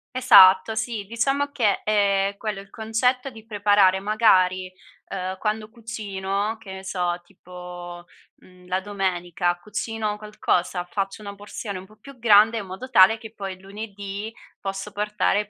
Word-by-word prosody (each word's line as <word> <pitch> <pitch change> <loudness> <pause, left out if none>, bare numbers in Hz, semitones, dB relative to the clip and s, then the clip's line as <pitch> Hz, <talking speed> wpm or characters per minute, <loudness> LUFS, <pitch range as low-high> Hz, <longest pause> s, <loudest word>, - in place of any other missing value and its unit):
Esatto. 205 -4 +7
Sì, 220 -2 -3
diciamo 270 +6 0
che, 215 -8 +1
ehm, 200 -2 +2
è - - -28
quello, 210 -3 -4
il 200 - -17
concetto 250 +4 0
di 220 -2 -13
preparare 205 -3 +4
magari, 185 -3 +3 0.4
uhm, 185 -1 -4
quando 215 0 -2
cucino 210 -2 -3
che 200 -4 -11
ne 190 0 -8
so, 180 -2 -2
tipo, 175 -1 -10 0.3
mhmm, 180 -1 -20
la 185 +1 0
domenica 175 -3 -1
cucino 210 +2 -3
qualcosa, 180 -4 -1
faccio 195 +1 -3
una 200 0 -6
porzione 200 -1 -7
un 190 - -12
po' 215 - -19
più 265 +3 -14
grande 220 0 +6
in 195 - -7
modo 250 +8 -8
tale 195 +2 +7
che 220 -1 -11
poi 195 -3 -6
lunedì 200 +1 -7 0.3
posso 195 +1 -5
portare 210 0 0
200 Hz, 150 wpm, -24 LUFS, 190-220 Hz, 0.4 s, Esatto